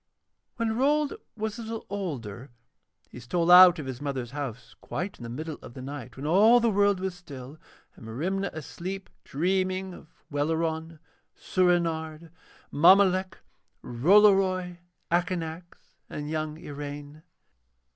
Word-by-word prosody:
When 225 Hz, -2 st, -1 dB
Rold 290 Hz, +3 st, +2 dB, 0.2 s
was 220 Hz, +1 st, -4 dB
a -, -, -4 dB
little 225 Hz, 0 st, -6 dB
older 135 Hz, -, -5 dB, 0.6 s
he -, -, -10 dB
stole 170 Hz, +9 st, 0 dB
out 180 Hz, 0 st, +9 dB
of 150 Hz, -, -6 dB
his 130 Hz, 0 st, -6 dB
mother's 135 Hz, -4 st, -4 dB
house 130 Hz, -5 st, -6 dB
quite 190 Hz, +3 st, -5 dB
in -, -, -9 dB
the 115 Hz, -, -6 dB
middle 155 Hz, +5 st, -6 dB
of 120 Hz, -, -12 dB
the 130 Hz, -, -8 dB
night 130 Hz, -3 st, -8 dB
when 135 Hz, -, -6 dB
all 210 Hz, +9 st, +6 dB
the 235 Hz, -1 st, +2 dB
world 200 Hz, -1 st, +2 dB
was 190 Hz, 0 st, -3 dB
still, 145 Hz, -4 st, -11 dB, 0.4 s
and 110 Hz, -, -12 dB
Merimna 185 Hz, -, -2 dB
asleep 185 Hz, +5 st, -7 dB
dreaming 185 Hz, +4 st, -1 dB
of 160 Hz, -, -13 dB, 0.2 s
Welleran, 160 Hz, +2 st, -2 dB, 0.4 s
Soorenard, 165 Hz, -3 st, 0 dB, 0.4 s
Mommolek, 185 Hz, +3 st, +5 dB, 0.5 s
Rollory, 185 Hz, -, +3 dB, 0.3 s
Akanax, 175 Hz, -1 st, -2 dB, 0.3 s
and 150 Hz, 0 st, -6 dB
young 155 Hz, -1 st, -3 dB
Iraine. 145 Hz, 0 st, -8 dB
165 Hz, 130 wpm, -27 LUFS, 145-190 Hz, 0.6 s, out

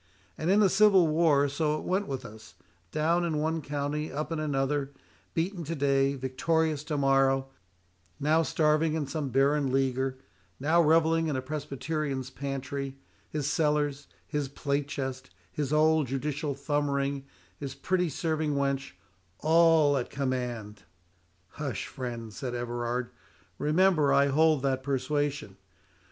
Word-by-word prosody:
And 155 Hz, -, -2 dB
in 200 Hz, +3 st, +5 dB
the 205 Hz, -, +6 dB
Civil 195 Hz, -2 st, +5 dB
War 155 Hz, -3 st, +3 dB
so 150 Hz, +2 st, 0 dB
it -, -, -7 dB
went 195 Hz, +2 st, 0 dB
with 135 Hz, -2 st, -4 dB
us—down 110 Hz, -, -3 dB
in 165 Hz, -3 st, -1 dB
one 160 Hz, +2 st, 0 dB
county, 145 Hz, +1 st, -3 dB
up 150 Hz, +4 st, -4 dB
in 165 Hz, -, -1 dB
another, 140 Hz, -1 st, -1 dB, 0.4 s
beaten 175 Hz, +2 st, -1 dB
to 165 Hz, +3 st, -3 dB
day, 140 Hz, -1 st, +2 dB
victorious 150 Hz, +3 st, 0 dB
tomorrow—now 135 Hz, -, 0 dB
starving 155 Hz, 0 st, +2 dB
in 155 Hz, -2 st, -1 dB
some 140 Hz, 0 st, -3 dB
barren 140 Hz, +1 st, +2 dB
leaguer—now 135 Hz, +4 st, -1 dB
revelling 165 Hz, +1 st, +3 dB
in 150 Hz, -, -1 dB
a 130 Hz, -, -1 dB
Presbyterian's 140 Hz, -1 st, -3 dB
pantry—his 135 Hz, +1 st, -5 dB
cellars, 150 Hz, -2 st, 0 dB, 0.2 s
his 145 Hz, -3 st, -2 dB
plate 140 Hz, 0 st, -2 dB
chest, 130 Hz, -2 st, -5 dB, 0.2 s
his 145 Hz, -2 st, -3 dB
old 155 Hz, -1 st, +3 dB
judicial 140 Hz, +2 st, -2 dB
thumb 145 Hz, +1 st, -1 dB
ring, 140 Hz, 0 st, -1 dB, 0.3 s
his 135 Hz, -2 st, -5 dB
pretty 180 Hz, +4 st, 0 dB
serving 155 Hz, 0 st, -1 dB
wench, 140 Hz, -5 st, -1 dB, 0.4 s
all 160 Hz, -2 st, +4 dB
at 125 Hz, -, -3 dB
command!" 125 Hz, -6 st, -3 dB, 0.8 s
"Hush, 130 Hz, -9 st, -3 dB
friend," 120 Hz, -5 st, -6 dB
said 125 Hz, +2 st, -4 dB
Everard; 120 Hz, 0 st, -3 dB, 0.5 s
"remember 155 Hz, -1 st, +3 dB
I 140 Hz, 0 st, +4 dB
hold 155 Hz, 0 st, +3 dB
that 135 Hz, -1 st, 0 dB
persuasion." 140 Hz, -5 st, -2 dB
140 Hz, 130 wpm, -28 LUFS, 135-155 Hz, 0.8 s, the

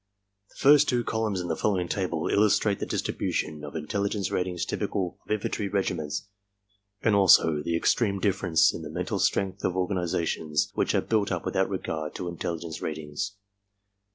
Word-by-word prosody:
The -, -, -24 dB
first 145 Hz, +1 st, +6 dB
two 120 Hz, -2 st, +1 dB
columns 110 Hz, -4 st, -1 dB
in 90 Hz, -, -4 dB
the 80 Hz, -, -1 dB
following 95 Hz, -3 st, 0 dB
table 90 Hz, -4 st, -1 dB
illustrate 105 Hz, -1 st, +3 dB
the -, -, -3 dB
distribution 75 Hz, -1 st, -2 dB
of 75 Hz, +1 st, -8 dB
intelligence 100 Hz, +5 st, -2 dB
ratings 90 Hz, -1 st, -1 dB
typical 90 Hz, -3 st, -2 dB
of -, -, -27 dB
infantry 105 Hz, -1 st, -1 dB
regiments 95 Hz, -3 st, -2 dB, 0.8 s
and 110 Hz, -, +3 dB
also 80 Hz, -6 st, +5 dB
the 85 Hz, +2 st, -1 dB
extreme 100 Hz, +3 st, +2 dB
differences 95 Hz, -4 st, +3 dB
in -, -, -6 dB
the -, -, -7 dB
mental -, -, -3 dB
strength 95 Hz, -1 st, 0 dB
of 90 Hz, -, 0 dB
or 90 Hz, -1 st, +1 dB
ganizations 85 Hz, -5 st, -1 dB
which -, -, 0 dB
are -, -, +3 dB
built 105 Hz, -3 st, 0 dB
up 90 Hz, -2 st, -2 dB
without 95 Hz, -1 st, +1 dB
regard 80 Hz, -5 st, -4 dB
to 90 Hz, -, -4 dB
intelligence 85 Hz, -1 st, -5 dB
ratings. 80 Hz, +6 st, -4 dB
95 Hz, 165 wpm, -27 LUFS, 80-100 Hz, 0.8 s, first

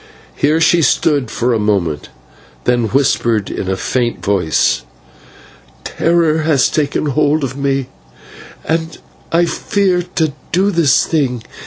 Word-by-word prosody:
Here 150 Hz, +3 st, +1 dB
she 170 Hz, +1 st, +3 dB
stood 145 Hz, -4 st, +1 dB
for 120 Hz, +2 st, 0 dB
a 115 Hz, -, 0 dB
moment, 95 Hz, -8 st, -1 dB, 0.5 s
then 120 Hz, -1 st, +1 dB
whispered 115 Hz, -3 st, +1 dB
in 95 Hz, -, -4 dB
a 95 Hz, -, -1 dB
faint 120 Hz, +1 st, -2 dB
voice: 90 Hz, -10 st, +1 dB, 1.0 s
"Terror 165 Hz, -2 st, +1 dB
has 155 Hz, -5 st, +2 dB
taken 150 Hz, 0 st, -1 dB
hold 150 Hz, +1 st, +1 dB
of 130 Hz, -1 st, -3 dB
me, 135 Hz, -2 st, -1 dB, 0.8 s
and 160 Hz, 0 st, -2 dB, 0.3 s
I 170 Hz, +1 st, +3 dB
fear 185 Hz, +2 st, 0 dB
to 160 Hz, -3 st, 0 dB, 0.2 s
do 195 Hz, +3 st, +2 dB
this 165 Hz, -7 st, +3 dB
thing." 130 Hz, -7 st, -1 dB
140 Hz, 130 wpm, -16 LUFS, 120-160 Hz, 1.0 s, she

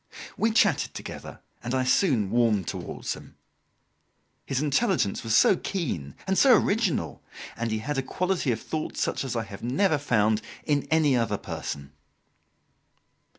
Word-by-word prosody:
We 225 Hz, -, +2 dB
chatted 220 Hz, -, +2 dB
together, -, -, -8 dB, 0.2 s
and 120 Hz, +2 st, -2 dB
I 130 Hz, -, +1 dB
soon 130 Hz, -, +2 dB
warmed 115 Hz, -6 st, +2 dB
towards -, -, -4 dB
him. -, -, -13 dB, 1.1 s
His 135 Hz, -, 0 dB
intelligence 150 Hz, -, +1 dB
was 115 Hz, -1 st, +1 dB
so -, -, +6 dB
keen, 120 Hz, -, -4 dB
and 190 Hz, 0 st, +1 dB
so 255 Hz, -5 st, +7 dB
original! 200 Hz, -4 st, 0 dB, 0.3 s
and 115 Hz, 0 st, -2 dB
he 110 Hz, -, -1 dB
had 135 Hz, +5 st, -2 dB
a -, -, +1 dB
quality 180 Hz, 0 st, -1 dB
of 115 Hz, -, -1 dB
thought 155 Hz, +6 st, -4 dB
such -, -, -1 dB
as 130 Hz, -3 st, -4 dB
I 115 Hz, -, 0 dB
have 100 Hz, -3 st, -10 dB
never 150 Hz, -, +1 dB
found 110 Hz, -5 st, +2 dB, 0.2 s
in 145 Hz, -2 st, 0 dB
any 155 Hz, -4 st, +3 dB
other 115 Hz, -4 st, 0 dB
person. 70 Hz, -6 st, -6 dB
130 Hz, 150 wpm, -26 LUFS, 110-170 Hz, 1.1 s, so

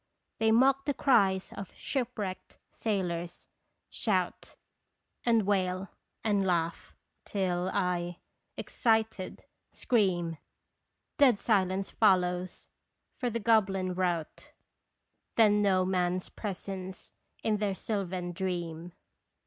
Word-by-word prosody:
They 220 Hz, 0 st, +3 dB
mock 270 Hz, +4 st, +4 dB
the 285 Hz, -, 0 dB
cries 195 Hz, -8 st, +3 dB
of 195 Hz, -, -8 dB
shipwrecked 230 Hz, -8 st, -4 dB
sailors; 175 Hz, -5 st, -3 dB, 0.4 s
shout, 185 Hz, -6 st, -1 dB, 0.7 s
And 230 Hz, -2 st, +4 dB
wail, 185 Hz, -1 st, 0 dB, 0.3 s
and 205 Hz, -3 st, +2 dB
laugh, 170 Hz, -3 st, -1 dB, 0.3 s
till 185 Hz, -2 st, -1 dB
I, 175 Hz, -2 st, -1 dB, 0.4 s
excited, 220 Hz, -4 st, 0 dB, 0.3 s
scream 175 Hz, -8 st, +1 dB, 0.8 s
Dead 260 Hz, -6 st, +6 dB
silence 195 Hz, -3 st, +1 dB
follows! 180 Hz, -3 st, +2 dB, 0.5 s
for 250 Hz, -, 0 dB
the 230 Hz, 0 st, -2 dB
goblin 195 Hz, -4 st, +2 dB
rout 175 Hz, -3 st, -2 dB, 0.8 s
Then 210 Hz, -2 st, +5 dB
know 190 Hz, -2 st, +3 dB
man's 180 Hz, -1 st, 0 dB
presence 190 Hz, -2 st, -5 dB, 0.3 s
in 215 Hz, -1 st, +2 dB
their 205 Hz, -2 st, -1 dB
sylvan 185 Hz, -4 st, -3 dB
dream. 175 Hz, -2 st, -4 dB
190 Hz, 95 wpm, -30 LUFS, 180-215 Hz, 0.8 s, Dead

